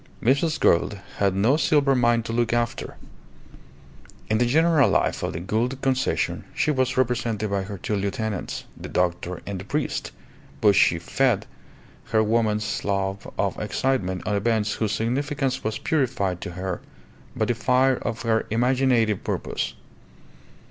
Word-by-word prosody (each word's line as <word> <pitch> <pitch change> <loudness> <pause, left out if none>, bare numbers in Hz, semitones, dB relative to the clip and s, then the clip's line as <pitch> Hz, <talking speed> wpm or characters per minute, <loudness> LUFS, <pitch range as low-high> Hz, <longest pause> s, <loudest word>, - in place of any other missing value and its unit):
Mrs. 140 +6 +2
Gould 85 +4 +3 0.2
had 100 -2 +2
no 115 +9 +3
silver 145 -2 +3
mine 120 -2 +3
to 115 - -5
look 120 0 +1
after. 120 0 -2 1.3
In 110 - +3
the 120 - +3
general 160 +1 +4
life - - +1
of - - -2
the 85 - -4
Gould 115 +8 -1
Concession 130 -1 0
she 155 - +2
was 130 -2 0
represented 115 -4 0
by 100 -1 +1
her 100 +1 -6
two 105 +4 -2
lieutenants, 100 0 -3
the - - -9
doctor 90 0 -1
and 100 -2 -4
the - - -7
priest, 145 +8 -2 0.5
but 105 -2 +5
she 85 - +4
fed 110 +5 +1 0.6
her 110 -1 +2
woman's 105 -1 0
love 100 0 -2
of - - -1
excitement 95 -9 -1
on 105 - 0
events 105 0 +1
whose 110 -3 -1
significance 135 +4 -1
was 110 0 -2
purified 120 - 0
to 85 - -6
her 90 0 -4 0.5
by - - +1
the 120 - +1
fire 130 +2 +2
of 115 -1 -4
her 110 -1 +1
imaginative 120 -2 +2
purpose. - - -3
115 Hz, 150 wpm, -24 LUFS, 100-130 Hz, 1.3 s, but